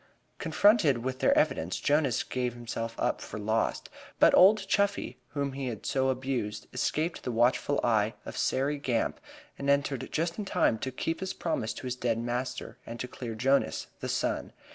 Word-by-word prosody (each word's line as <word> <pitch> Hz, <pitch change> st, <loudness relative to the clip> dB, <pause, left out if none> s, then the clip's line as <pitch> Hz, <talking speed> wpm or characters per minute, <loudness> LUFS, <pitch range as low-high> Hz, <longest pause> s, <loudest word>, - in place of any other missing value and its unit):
Confronted 165 Hz, -, +4 dB
with 130 Hz, 0 st, -3 dB
their -, -, +4 dB
evidence 85 Hz, +3 st, +1 dB
Jonas 145 Hz, -4 st, +2 dB
gave 125 Hz, -2 st, -2 dB
himself 115 Hz, -1 st, -5 dB
up -, -, 0 dB
for -, -, -7 dB
lost, 110 Hz, +2 st, 0 dB, 0.3 s
but -, -, +6 dB
old 195 Hz, +1 st, +6 dB
Chuffey, 200 Hz, 0 st, 0 dB, 0.2 s
whom 140 Hz, -1 st, -1 dB
he 135 Hz, -1 st, -4 dB
had 115 Hz, -4 st, -5 dB
so 130 Hz, 0 st, +1 dB
abused, 125 Hz, -5 st, -2 dB
escaped 160 Hz, +3 st, -1 dB
the 125 Hz, -, -3 dB
watchful 120 Hz, +4 st, +2 dB
eye 110 Hz, -2 st, +2 dB
of -, -, -7 dB
Sairey 140 Hz, +2 st, 0 dB
Gamp 125 Hz, -5 st, -1 dB, 0.4 s
and 140 Hz, -, -1 dB
entered 140 Hz, -2 st, +1 dB
just 165 Hz, +4 st, -1 dB
in 210 Hz, -, -3 dB
time 115 Hz, -, +2 dB
to 130 Hz, -, -3 dB
keep 165 Hz, +5 st, -2 dB
his 190 Hz, 0 st, -3 dB
promise 155 Hz, -10 st, -2 dB
to -, -, -9 dB
his 125 Hz, -1 st, -2 dB
dead 120 Hz, -3 st, 0 dB
master 120 Hz, +2 st, -3 dB
and 115 Hz, +1 st, -8 dB
to 125 Hz, -, -3 dB
clear 120 Hz, -3 st, -6 dB
Jonas, 135 Hz, +5 st, +1 dB
the -, -, -4 dB
son. -, -, -1 dB
130 Hz, 180 wpm, -29 LUFS, 115-145 Hz, 0.4 s, but